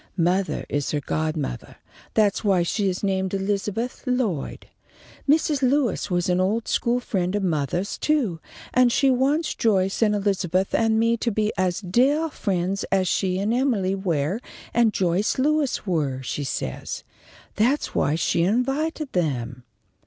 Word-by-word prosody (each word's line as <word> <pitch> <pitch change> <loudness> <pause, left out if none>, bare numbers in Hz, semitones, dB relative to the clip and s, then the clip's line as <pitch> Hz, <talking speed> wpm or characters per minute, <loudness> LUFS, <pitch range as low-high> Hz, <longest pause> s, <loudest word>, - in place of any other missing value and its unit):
Mother 180 +2 +1
is 145 -1 -2
her 150 - 0
godmothah. 155 - -3 0.4
That's 210 -1 +2
why 190 -4 +3
she 200 +3 0
is 185 +2 -4
named 190 -1 0
Elizabeth 205 +4 -2
Lloyd. 235 - -1 0.6
Mrs. 300 -1 +3
Lewis 260 -4 +1
was 175 -1 0
an 180 0 +2
old 215 +5 0
school 240 +1 +1
friend 185 -5 -1
of 205 - -1
mothah's, 175 +3 -1
too, 255 - +1 0.3
and 250 -1 +5
she 270 +2 +3
wants 280 +5 +1
Joyce 195 -3 +1
and 210 -2 +3
Elizabeth 195 -2 0
and 225 -1 +2
me 230 +1 +2
to 235 - -1
be 215 0 0
as 185 +1 0
deah 270 - +2
friends 190 -3 -1
as 190 -1 +1
she 185 0 0
and 205 +4 0
Emily 235 -7 +1
Ware 180 -1 -1 0.3
and 235 -2 +4
Joyce 185 +1 0
Lewis 290 -2 +1
were, 145 -8 -1
she 145 +3 -3
says. 65 - -4 0.5
That's 250 +8 +1
why 150 - +1
she 165 +1 +1
invited 270 - 0
them." 125 -8 -2
195 Hz, 150 wpm, -24 LUFS, 180-240 Hz, 0.6 s, and